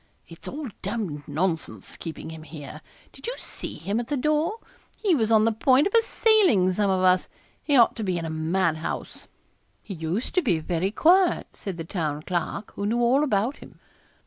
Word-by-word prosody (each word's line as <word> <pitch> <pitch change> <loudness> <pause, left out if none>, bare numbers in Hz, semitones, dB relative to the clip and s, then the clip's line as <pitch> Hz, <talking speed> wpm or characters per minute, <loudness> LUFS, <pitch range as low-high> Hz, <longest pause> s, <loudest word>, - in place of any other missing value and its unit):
It's 165 - -12
all 295 0 -5
d 215 - -10
d 195 -8 -3
nonsense 165 +3 -2
keeping 160 -1 -7
him 160 -1 -9
here 155 -3 -9 0.3
did - - -10
you - - -2
see - - -6
him 205 +3 -2
at 240 - -4
the 290 - -1
door? 305 - +1 0.4
he 400 -5 +2
was 225 -7 +1
on 220 -1 +5
the 230 - +3
point 260 +5 +3
of 395 - -1
assailing 430 - +4
some 205 +1 +1
of 185 -1 +1
us. 185 0 +3 0.3
He 290 -2 +2
ought 235 - +5
to 225 - -3
be 185 -3 0
in 165 - -3
a - - -3
madhouse.' 160 0 -2 0.6
'He 200 - -7
used 170 +7 -3
to 365 - +3
be 215 - +1
very 170 +3 -1
quiet,' 350 - +3
said 195 -4 -6
the 165 - -4
Town 155 -5 -3
Clerk, 180 +4 -3
who 200 - -3
knew 235 +3 +1
all 250 +5 +3
about 235 0 0
him. - - -15
200 Hz, 200 wpm, -25 LUFS, 170-265 Hz, 0.6 s, on